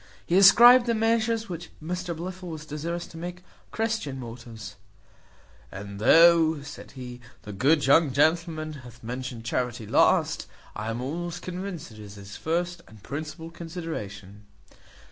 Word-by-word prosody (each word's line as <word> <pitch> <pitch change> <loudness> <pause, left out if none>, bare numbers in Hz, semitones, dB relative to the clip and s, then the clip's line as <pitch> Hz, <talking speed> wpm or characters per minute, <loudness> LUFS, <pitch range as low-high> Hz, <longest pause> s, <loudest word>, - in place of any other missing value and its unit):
He 170 - 0
ascribed 235 +6 +8
the 235 - +2
measures 225 0 +1
which 175 -2 -7
Mr 175 +1 -4
Blifil 180 +1 -6
was 155 -1 -7
desirous 165 +3 -4
to 165 - -11
take 175 +1 -5
to 180 - -19 0.3
Christian 220 -12 -2
motives; 115 -5 -9 1.0
"and 100 +1 -8
though," 160 +4 +6
says 145 -1 -10
he, 125 -2 -9 0.2
"the 105 - -8
good 140 +9 +3
young 145 +2 +5
gentleman 155 +2 +1
hath 120 -2 -14
mentioned 125 -1 -6
charity 120 -1 -2
last, - - +2 0.3
I 105 +1 -4
am 115 +2 -3
almost 170 +6 -4
convinced 180 -4 -6
it 110 - -13
is 105 -1 -10
his 100 0 -10
first 175 - -2
and 110 -2 -17
principal 160 +3 -6
consideration." 105 - -7
155 Hz, 145 wpm, -26 LUFS, 120-175 Hz, 1.0 s, ascribed